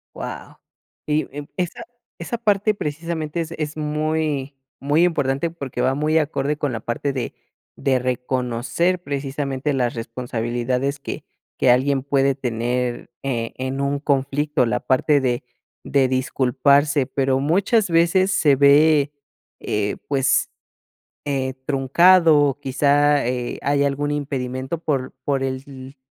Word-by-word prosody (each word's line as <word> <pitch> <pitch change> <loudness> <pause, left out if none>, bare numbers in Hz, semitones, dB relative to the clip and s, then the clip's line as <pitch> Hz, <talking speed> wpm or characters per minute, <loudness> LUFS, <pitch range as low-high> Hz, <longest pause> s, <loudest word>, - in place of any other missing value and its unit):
Guau. - - -7 0.5
Y, 150 +1 +1
em, 145 -1 -5
esa 180 +6 -3 0.4
esa 235 - -4
parte 210 -2 +2
precisamente 160 0 -4
es 165 -1 -4
es 155 0 -3
muy 150 -2 -1 0.3
muy 145 +4 +2
importante, 145 -2 0
porque 140 -6 -6
va 130 - +2
muy 155 +2 +2
acorde 150 -1 -1
con 145 -3 -2
la 115 - -4
parte 135 +4 -2
de 130 -3 -4 0.4
de 130 -2 +1
reconocer, 125 +7 -1
precisamente, 140 -1 -3
las 125 -3 0
responsabilidades 120 +3 -2
que - - -6 0.3
que 125 - +4
alguien 135 +2 +3
puede 140 -1 +2
tener 120 0 -2
e 115 -4 -2
en 130 +1 -3
un 140 0 0
conflicto, 140 0 0
la 110 -2 0
parte 140 +2 +2
de 125 -2 0 0.4
de 135 -2 +2
disculparse, 135 +2 +2
pero 135 -1 0
muchas 195 - +2
veces 170 +3 +3
se 150 -6 +4
ve, 145 +1 +5 0.5
eh, 105 -1 -1
pues, 135 -1 +2 0.8
eh, 135 -2 -2
truncado, 150 +1 +4
quizá, 145 +1 +2
eh, 125 -1 -2
haya 140 0 +2
algún 145 +1 -2
impedimento 135 0 -3
por 140 -5 -2
por 140 -2 0
el 130 0 -6
140 Hz, 130 wpm, -22 LUFS, 130-150 Hz, 0.8 s, ve